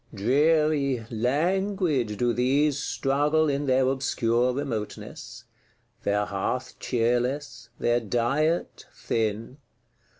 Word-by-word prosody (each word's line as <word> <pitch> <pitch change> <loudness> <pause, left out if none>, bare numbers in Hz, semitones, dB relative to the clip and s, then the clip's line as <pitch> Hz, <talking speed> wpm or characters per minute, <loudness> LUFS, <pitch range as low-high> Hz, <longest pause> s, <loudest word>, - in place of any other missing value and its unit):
Dreary, 140 +2 +2
languid 150 - 0
do 120 +1 +1
these 140 +4 +2
struggle 145 +3 +1
in 140 0 -1
their 130 0 +3
obscure 125 -2 +1
remoteness; 125 -6 -5 0.6
their 105 0 0
hearth 125 +6 -3
cheerless, 125 +1 -1
their 120 0 +2
diet 125 - -1
thin. 115 +4 -2
130 Hz, 90 wpm, -26 LUFS, 115-145 Hz, 0.6 s, their